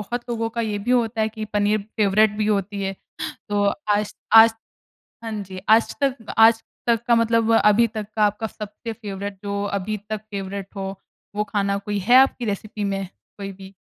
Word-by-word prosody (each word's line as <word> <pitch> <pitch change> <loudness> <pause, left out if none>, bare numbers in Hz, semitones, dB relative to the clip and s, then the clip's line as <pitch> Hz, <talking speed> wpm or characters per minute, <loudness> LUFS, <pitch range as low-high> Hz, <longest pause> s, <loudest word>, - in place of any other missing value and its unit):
बहुत 240 +4 -5
लोगों 230 -1 -1
का - - +1
ये 215 -2 -2
भी 210 +5 -3
होता 230 -2 +1
है 220 - +2
कि 220 0 -6
पनीर 205 +1 +2 0.2
फ़ेवरेट 215 0 +4
भी 215 - 0
होती 200 -1 -1
है। 195 0 -2 0.6
तो 205 0 +1 0.3
आज 205 0 -2 0.2
आज 225 0 +9 0.7
हाँ 225 - -4
जी, 185 -1 -8
आज 220 +1 +4
तक 260 -5 -1
आज 225 0 +6 0.2
तक 230 -1 +2
का 235 - +5
मतलब 230 0 +2
अभी 225 +1 +5
तक 215 -1 -5
का 215 - +4
आपका 210 +2 0
सबसे 215 +2 -7
फ़ेवरेट, 200 -2 -6
जो 200 0 -2
अभी 200 +1 -2
तक 215 -1 -2
फ़ेवरेट 195 0 -6
हो, 195 0 -4 0.4
वो 210 - +1
खाना 200 -2 -1
कोई 205 +1 -3
है 245 - +8
आपकी 265 -2 +4
रेसिपी 210 0 -4
में 195 -1 -2 0.3
कोई 195 -1 -5
भी? 190 0 -13
210 Hz, 190 wpm, -22 LUFS, 200-225 Hz, 0.7 s, आज